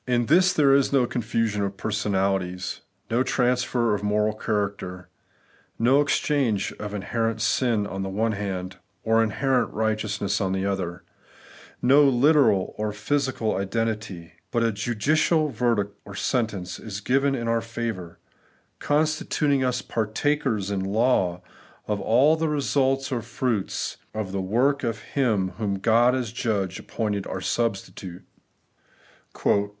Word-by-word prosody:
For - - -2
^ - - +3
In 120 0 +1
tMs 180 +7 +4
there 140 -3 +5
is 140 -1 +3
no 135 -3 +3
confusion 115 -3 -1
of 100 0 -3
personalities; 95 -3 -1 0.3
no 120 +2 +2
transfer 125 -3 +1
of 105 - -1
moral 105 +1 +1
character; 100 -4 -3 0.7
no 130 +5 +4
exchange 140 -7 0
of 105 -1 -5
inherent 115 +2 -1
sin 110 -1 +1
en 95 -1 -5
the 95 - -3
one 110 +4 0
hand, 95 -3 -4 0.3
or 115 0 +3
inJierent 130 +4 +1
righteousness 110 -2 -1
on 95 -1 0
the 95 0 -1
other; 90 -3 -3 0.8
no 135 +4 +6
literal 135 -6 +4
or 105 0 -1
physical 130 +1 -1
identity; 100 -4 -3 0.2
but 115 - 0
a 115 - +2
judicial 145 +9 +1
verdict 110 -5 0
orsentence 100 -3 -2
is 100 -3 -5
given 135 +6 +1
in 120 -3 -3
our 115 0 +1
favour, 115 -7 -5 0.6
constituting 150 -2 +1
us 125 -1 0
partakers 110 -1 -1
in 100 - -1
law 95 -3 +1 0.4
of 105 -1 -1
all 135 +8 +4
the 160 0 -1
results 135 -2 +1
or 125 - 0
fmits 115 -2 -2 0.2
of 105 -3 -3
the 95 0 -2
work 125 +9 +1
of 115 -2 -1 0.2
Him 110 -9 +1
whom 100 -3 -1
God, 120 +5 +4
as 125 -4 -2
Judge, 100 -6 -2
appointed 105 -3 -3
our 95 - -4
substitute. 95 -4 -3
110 Hz, 135 wpm, -25 LUFS, 100-130 Hz, 0.8 s, no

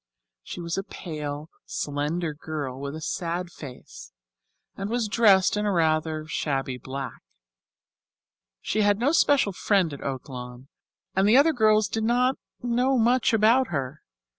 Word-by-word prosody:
She 180 - -8
was 170 +2 -3
a - - -3
pale, 150 -5 -6 0.2
slender 150 +3 -2
girl, 145 -4 -5
with 140 +1 -5
a 160 - -7
sad 170 +2 -3
face, 125 - -11 0.6
and 195 +1 -4
was 235 -1 0
dressed 205 -4 +4
in 210 0 0
rather 155 -4 +1
shabby 135 -4 -2
black. 130 -1 -6 1.4
She 215 - 0
had 205 -1 +3
no 250 +6 +2
special 285 -9 +3
friend 185 -4 +1
at 140 - -8
Oaklawn, 125 -1 -7 0.5
and 195 +2 +3
the 235 - +6
other 310 +3 +5
girls 215 -4 +3
did 220 - -2
not 250 +3 +2 0.3
know 250 +2 +2
much 245 +2 +3
about 230 +4 +4
her. 140 -4 -4
175 Hz, 140 wpm, -26 LUFS, 145-220 Hz, 1.4 s, the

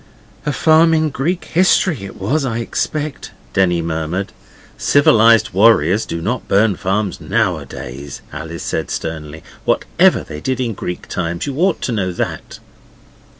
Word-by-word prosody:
'A - - +2
farm 160 +3 +4
in 155 -1 +1
Greek 170 +8 -2
history 175 - +2
it 95 - -10
was, 135 +11 0
I 120 -4 -2
expect,' 150 +5 -3 0.2
Denny 90 -3 +2
murmured. 80 +4 -3 0.4
'Civilized 115 -5 +4
warriors 100 -1 +4
do 85 0 -4
not 120 +4 -2
burn 100 0 +3
farms 95 0 -2
nowadays,' 70 +1 -3
Alice 80 +2 -6
said - - -2
sternly, 80 -1 -5 0.2
'whatever - - +2
they 75 - -8
did 130 +5 -2
in 120 -3 -1
Greek 90 -2 -6
times. 85 -1 -3
You 140 - -4
ought 185 -1 +2
to - - -2
know 95 -5 -1
that. - - -4
105 Hz, 145 wpm, -18 LUFS, 85-135 Hz, 0.4 s, farm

